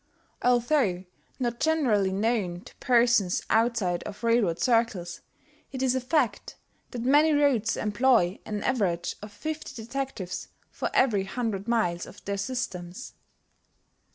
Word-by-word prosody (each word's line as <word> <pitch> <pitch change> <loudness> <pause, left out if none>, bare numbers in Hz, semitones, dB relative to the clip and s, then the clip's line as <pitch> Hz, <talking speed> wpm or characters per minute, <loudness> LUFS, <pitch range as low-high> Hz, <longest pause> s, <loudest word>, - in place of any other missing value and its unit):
Although 240 -6 +2 0.3
not 240 -2 -2
generally 245 -12 +2
known 195 -4 -1
to - - -15
persons 235 -7 +3
outside 225 -6 +2
of 210 +3 -9
railroad 230 -8 +2
circles, 225 -8 0 0.5
it 265 -1 -3
is 255 -1 +3
a 260 - 0
fact 250 -5 0 0.3
that 240 -2 -5
many 295 +5 +5
roads 270 -7 +2
employ 215 -3 +2
an 210 -1 -4
average 185 -9 0
of 210 0 -9
fifty 310 +7 -6
detectives 235 -5 -5 0.2
for - - -3
every 210 -7 +3
hundred 215 -1 -3
miles 180 -8 0
of - - -14
their 200 0 -2
systems. 195 -3 -5
230 Hz, 125 wpm, -27 LUFS, 195-255 Hz, 0.5 s, many